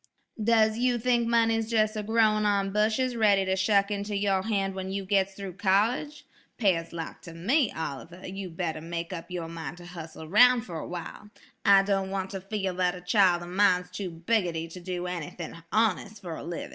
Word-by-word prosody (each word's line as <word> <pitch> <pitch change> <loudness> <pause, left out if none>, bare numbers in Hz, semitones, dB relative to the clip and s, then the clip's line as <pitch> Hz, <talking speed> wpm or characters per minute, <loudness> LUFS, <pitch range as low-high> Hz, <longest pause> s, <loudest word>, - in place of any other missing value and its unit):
"Does 220 0 +3
you 245 0 +2
think 240 0 +1
money's 225 -1 +2
jes' 215 -1 +2
a 215 - -2
growin' 215 0 +2
on 200 -1 +1
bushes 220 +5 +1
ready 205 -4 +4
to 190 0 +1
shuck 200 +1 +2
into 205 0 -3
your 195 -1 +1
hand 195 -2 -1
when 190 0 -5
you 195 0 -3
gits 195 0 +1
through 195 -2 -7
college? 215 +9 +1 0.3
Pears 180 -7 +1
lak 165 -1 -6
to 165 -1 -11
me, 235 - +2
Oliver, 160 +4 -6
you'd 185 -3 -7
better 160 -4 -2
make 170 +2 -5
up 170 0 -7
yer 175 -2 -4
min' 165 -2 -6
to 175 0 -12
hussle 165 -3 -9
aroun' 245 +9 +5
fer 175 -6 -7
awhile. 175 +5 -7 0.3
I 195 -1 +6
don't 195 -1 0
want 190 -1 -3
ter 195 - -4
feel 195 -1 -3
that 180 0 +1
a 180 - -9
chile 180 -2 +3
o' - - -7
min's 180 0 +2
too 195 -3 -4
biggotty 170 -1 -1
to 180 - -8
do 180 0 -4
anything 175 -1 -5 0.2
hones' 215 -1 +1
fer 175 -5 -6
a - - -7
livin'. 170 0 -5
195 Hz, 195 wpm, -28 LUFS, 175-215 Hz, 0.3 s, I